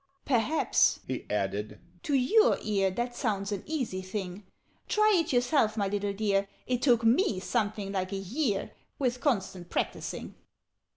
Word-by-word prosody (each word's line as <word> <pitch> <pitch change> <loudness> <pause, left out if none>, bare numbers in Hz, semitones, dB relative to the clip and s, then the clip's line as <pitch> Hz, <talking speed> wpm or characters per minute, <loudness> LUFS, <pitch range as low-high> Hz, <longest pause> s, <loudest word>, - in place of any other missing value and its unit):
"Perhaps," 270 +4 +2
he 130 - -5
added, 105 +1 -2 0.2
"to 290 - 0
your 425 - +4
ear 200 -3 +1
That 240 +5 -3
sounds 205 -5 -1
an 200 -2 -2
easy 255 -12 -2
thing? 185 0 -6 0.4
Try 425 0 +4
it - - -5
yourself, 245 -3 +2
my 200 -2 +1
little 205 0 -1
dear! 200 -1 0 0.2
It 250 -1 -1
took 240 -4 +4
me 225 - +3
something 210 -1 -1
like 185 -1 -2
a - - -2
year, 205 - -1 0.3
With 250 -2 -1
constant 190 - -1
practising. - - -3
210 Hz, 150 wpm, -29 LUFS, 195-250 Hz, 0.4 s, your